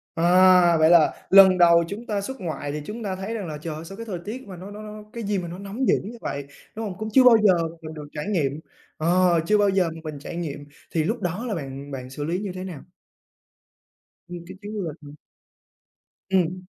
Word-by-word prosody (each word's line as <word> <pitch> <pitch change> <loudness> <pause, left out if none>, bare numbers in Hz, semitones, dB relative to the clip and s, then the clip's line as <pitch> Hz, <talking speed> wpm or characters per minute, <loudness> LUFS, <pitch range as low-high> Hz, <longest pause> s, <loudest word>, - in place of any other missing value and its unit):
À, 180 0 +5
vậy 155 0 +5
là 170 -3 +6 0.2
lần 190 -1 +8
đầu 170 -1 +6
chúng 210 +5 -7
ta 205 -3 -2
xuất 265 +3 -7
ngoại 155 -4 -4
thì 150 0 -4
chúng 225 +2 -6
ta 190 -2 -2
thấy 195 +4 -5
rằng 210 -6 -4
là 150 -2 -5
"Trời 155 0 -6
ơi, 160 +2 -8
sao 195 +3 -9
cái 230 - -7
thời 190 -6 -5
tiết 230 +3 -7
mà 185 -3 -9
nó 190 +3 -9
nó 210 +1 -9
nó 210 0 -9
cái 235 -1 -5
gì 205 0 -1
mà 175 - -4
nó 175 +2 -7
nóng 205 +6 -3
dữ - - +5
như 230 +4 -8
vậy!", 140 0 -4 0.3
đúng 225 +1 -4
hông? 185 -4 -6
Cũng 215 +1 -4
chưa 265 - +7
bao 245 -2 +8
giờ 195 -3 +6 0.3
mình 155 0 -8
được 150 -2 -8
trải 150 +4 -5
nghiệm, 155 -8 0 0.4
ờ, 175 +1 +3
chưa 210 +3 +3
bao 205 -1 +3
giờ 190 -3 +2
mà 165 - -10
mình 150 -2 -6
trải 155 - -8
nghiệm, 145 -4 -5 0.3
thì 160 -2 +1
lúc - - -2
đó 180 +7 -3
là 215 - -2
bạn 140 -2 -7
bạn 130 -2 -6
xử 145 +2 -6
lý 170 +4 -1
như 200 -2 -4
thế 185 0 -6
nào? 180 -7 -7 1.5
Nguyên 175 -1 -8
cái 185 - -10
chuyến 210 +1 -7
du 210 - -3
lịch 160 -3 -5
hả? 145 0 -12 1.2
Ừm. 185 -1 0
180 Hz, 245 wpm, -24 LUFS, 160-205 Hz, 1.5 s, lần